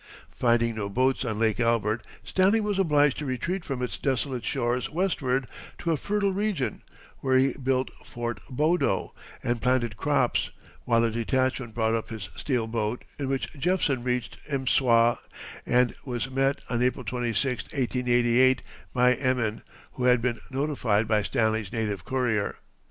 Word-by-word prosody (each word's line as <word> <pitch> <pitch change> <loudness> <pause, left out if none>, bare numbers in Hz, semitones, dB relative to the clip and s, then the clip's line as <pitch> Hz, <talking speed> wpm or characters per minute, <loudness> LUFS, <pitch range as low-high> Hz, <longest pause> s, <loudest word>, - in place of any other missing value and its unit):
Finding 115 -1 +2
no 105 -2 -3
boats 130 +6 +1
on 110 -4 -2
Lake 110 +1 +1
Albert, 115 -1 +1 0.2
Stanley 190 +4 +3
was 210 -2 -1
obliged 150 -6 +3
to 150 - -4
retreat 170 +9 -2
from 130 -3 -3
its 125 - -3
desolate 130 -2 -1
shores 125 -2 -1
westward 145 -7 0 0.3
to 170 - -1
a - - +3
fertile 200 +5 0
region, 200 -9 -1 0.4
where 130 -1 +2
he 130 0 +3
built 130 -1 -1
Fort 120 -1 -4
Bodo 150 - +1 0.3
and 120 -1 -1
planted 125 -3 +1
crops, - - +1 0.4
while 115 -1 +3
a 115 - +2
detachment 125 0 -1
brought 110 -1 +1
up 115 -1 -2
his 110 -4 -6
steel 125 -6 -1
boat, 110 +1 -2 0.2
in 135 -2 -2
which 135 -1 -2
Jephson 145 -3 +1
reached 125 -1 -2
M'swa 125 -4 +3 0.5
and 125 0 +3
was 125 0 -3
met, 135 +1 +1
on 120 -1 -1
April 125 0 0
26, 120 +2 -1
1888, 125 -1 +2 0.3
by 125 0 +5
Emin, 125 -4 0 0.3
who 125 - -2
had 125 -1 +5
been 120 0 -1
notified 130 -6 0
by 110 -1 +3
Stanley's 110 -2 0
native 105 -4 -2
courier. 120 -6 0
125 Hz, 150 wpm, -27 LUFS, 115-135 Hz, 0.5 s, by